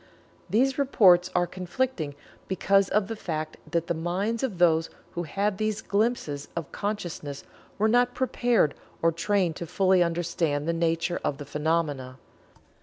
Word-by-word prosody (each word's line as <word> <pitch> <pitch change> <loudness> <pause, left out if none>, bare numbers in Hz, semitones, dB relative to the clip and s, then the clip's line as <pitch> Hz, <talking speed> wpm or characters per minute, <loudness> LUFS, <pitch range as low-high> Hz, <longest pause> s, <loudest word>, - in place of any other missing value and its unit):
These 260 +8 +2
reports 185 -10 +5
are 175 0 +3
conflicting 180 - -3 0.3
because 195 +1 +2
of 205 -1 +1
the 225 - -4
fact 155 -6 -4
that 170 -1 0
the 170 - -1
minds 185 +8 -1
of 245 -9 -2
those 165 -2 +3 0.2
who 175 - -3
had 200 +3 -1
these 215 -1 -1
glimpses 200 -9 -1
of 170 -4 -4
consciousness 175 -9 -4 0.3
were 215 - +3
not 245 +2 +3
prepared 240 - +2 0.3
or 165 - +5
trained 170 0 0
to 170 - -5
fully 190 +1 +3
understand 165 -3 0
the 170 - +1
nature 165 +1 0
of 140 - -1
the 145 - -7
phenomena. 150 -3 -1
175 Hz, 150 wpm, -27 LUFS, 160-210 Hz, 0.3 s, reports